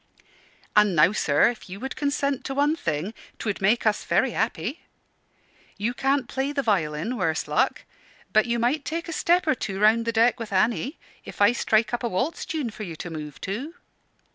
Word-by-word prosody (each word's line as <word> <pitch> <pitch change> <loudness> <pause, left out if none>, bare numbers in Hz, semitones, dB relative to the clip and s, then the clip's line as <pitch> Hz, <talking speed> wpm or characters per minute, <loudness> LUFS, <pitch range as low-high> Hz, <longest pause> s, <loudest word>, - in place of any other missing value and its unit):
"And 210 -3 +5
now, 155 +4 +6
sir, 150 -3 +3
if 225 -4 -12
you 190 +2 -7
would 265 +3 -5
consent 280 -2 -1
to 270 - -3
one 290 +3 +2
thing, 165 - -3 0.2
'twould 205 -3 -3
make 215 +5 +2
us 215 -1 +2
very 195 +9 +2
happy. 225 - -2 1.0
You 220 +4 -1
can't 270 0 0
play 270 +2 -2
the 280 -1 -1
violin, 180 +1 0
worse 165 -5 -1
luck; - - +1 0.5
but 215 +2 +4
you 235 0 0
might 250 +6 +1
take 335 +4 -4
a 335 - -4
step 350 +3 +2
or 310 - +3
two 195 -6 -4
round 220 +2 +4
the 230 - 0
deck 230 +2 +3
with 225 -3 -6
Annie, 230 - +1 0.3
if - - -11
I 205 +2 +6
strike 225 -1 +1
up 240 - -1
a 240 - -1
waltz 255 - -2
tune 300 -9 -2
for 215 - -11
you 175 -6 -5
to 175 +2 -7
move 150 -2 -7
to." 250 - -4
230 Hz, 195 wpm, -25 LUFS, 195-270 Hz, 1.0 s, now